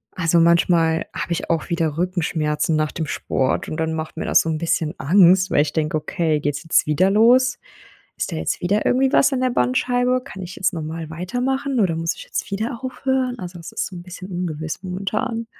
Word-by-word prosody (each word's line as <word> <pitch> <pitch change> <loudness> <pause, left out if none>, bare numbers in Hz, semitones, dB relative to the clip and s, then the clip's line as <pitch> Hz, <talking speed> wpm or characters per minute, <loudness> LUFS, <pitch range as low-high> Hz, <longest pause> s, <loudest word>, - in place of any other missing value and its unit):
Also 170 -1 +2
manchmal 170 -1 +3
habe - - -4
ich 170 - -2
auch 165 +2 -1
wieder 165 -3 -1
Rückenschmerzen 165 -3 0
nach 155 -1 0
dem 160 -3 -4
Sport 130 -2 -1
und 155 - -4
dann 160 0 -1
macht 160 0 -5
mir - - -3
das - - +4
so 165 - -3
‘n 155 - -1
bisschen 160 -1 -1
Angst, 185 +3 +4
weil 145 - +4
ich 145 -1 -1
denke: 155 -1 -1
„Okay, 155 0 -1
geht's 145 +1 -2
jetzt 165 - +3
wieder 170 +6 +2
los? 245 +4 +4 0.6
Ist - - -3
da - - -3
jetzt 80 0 -2
wieder 200 +4 +1
irgendwie 265 +2 +2
was 275 +1 +5
an 260 - 0
der 255 0 +1
Bandscheibe? 245 - +1
Kann 195 -9 -9
ich 180 0 -8
jetzt 190 0 +1
normal 160 0 -5
weitermachen, 250 - -2
oder 175 -5 +2
muss 165 +1 -1
ich - - -9
jetzt 210 - -5
wieder 225 +4 -3
aufhören?“ 255 -1 -1
Also, 180 -1 -7
es 165 - -9
ist - - -2
so 185 - -8
‘n 175 - -8
bisschen 185 +1 -9
ungewiss 170 -1 -4
momentan. 215 +6 -3
175 Hz, 210 wpm, -21 LUFS, 160-225 Hz, 0.6 s, was